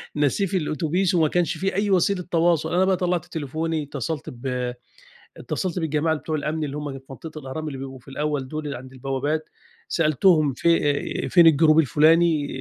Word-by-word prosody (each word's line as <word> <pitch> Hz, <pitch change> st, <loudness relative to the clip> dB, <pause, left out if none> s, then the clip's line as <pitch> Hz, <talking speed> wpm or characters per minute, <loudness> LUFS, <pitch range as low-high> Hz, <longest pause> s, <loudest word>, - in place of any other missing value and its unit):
ناسيه 150 Hz, +7 st, +1 dB
في 190 Hz, +1 st, -1 dB
الأوتوبيس 165 Hz, +4 st, 0 dB
وما 160 Hz, -3 st, +4 dB
كانش 175 Hz, +2 st, 0 dB
في 195 Hz, 0 st, -2 dB
أي 205 Hz, +1 st, 0 dB
وسيلة 185 Hz, +1 st, +2 dB
تواصل. 165 Hz, -1 st, +2 dB
أنا 185 Hz, +1 st, +3 dB
بقى 190 Hz, -1 st, +2 dB
طلعت 180 Hz, -2 st, -1 dB
تليفوني، 160 Hz, +1 st, -3 dB
اتصلت 145 Hz, +1 st, -5 dB
ب 125 Hz, 0 st, -3 dB, 0.6 s
اتصلت 185 Hz, -2 st, -3 dB
بالجماعة 160 Hz, 0 st, 0 dB
ال 155 Hz, -, -4 dB
بتوع 155 Hz, +1 st, -3 dB
الأمن 155 Hz, +1 st, -2 dB
اللي 145 Hz, 0 st, -5 dB
هُم 150 Hz, -2 st, -4 dB
في 135 Hz, -, -20 dB
منطقة 155 Hz, +4 st, -8 dB
الأهرام، 140 Hz, +4 st, -6 dB
اللي 135 Hz, -2 st, -6 dB
بيبقوا 135 Hz, -1 st, -7 dB
في 125 Hz, -, -21 dB
الأول 145 Hz, -1 st, -2 dB
دول، 155 Hz, +1 st, -5 dB
اللي 140 Hz, -, -4 dB
عند 130 Hz, +1 st, -11 dB
البوابات. 135 Hz, +4 st, -2 dB, 0.4 s
سألتهم 155 Hz, -1 st, +3 dB
ف -, -, -14 dB, 0.7 s
فين 175 Hz, -2 st, +6 dB
الجروب 155 Hz, 0 st, +5 dB
الفلاني، 155 Hz, +2 st, +3 dB
155 Hz, 180 wpm, -23 LUFS, 140-170 Hz, 0.7 s, فين